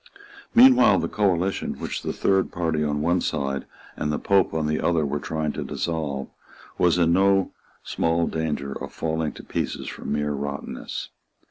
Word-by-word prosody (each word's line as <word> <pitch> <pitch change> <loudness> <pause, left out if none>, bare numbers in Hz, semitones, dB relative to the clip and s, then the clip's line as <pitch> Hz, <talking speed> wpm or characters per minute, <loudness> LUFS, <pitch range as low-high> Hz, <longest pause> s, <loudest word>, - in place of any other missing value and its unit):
Meanwhile 255 +2 +7
the - - 0
coalition, 95 -2 0
which - - -4
the - - -3
Third 95 -1 +1
Party 80 -3 -1
on 75 0 -1
one 85 +2 +2
side 70 -3 -2 0.3
and 75 - -2
the 75 - 0
Pope 100 -2 +2
on 80 -1 -1
the 75 0 0
other 80 -3 +2
were 75 +1 -2
trying 80 0 -2
to - - -4
dissolve, 75 -5 -3 0.5
was 90 -1 +4
in 85 -1 +3
no 95 +1 +3 0.3
small 85 0 0
danger 75 -3 -2
of - - -6
falling 80 -1 -2
to - - -11
pieces - - -3
from - - -6
mere 75 0 0
rottenness. 70 0 -5
80 Hz, 165 wpm, -24 LUFS, 75-90 Hz, 0.5 s, Meanwhile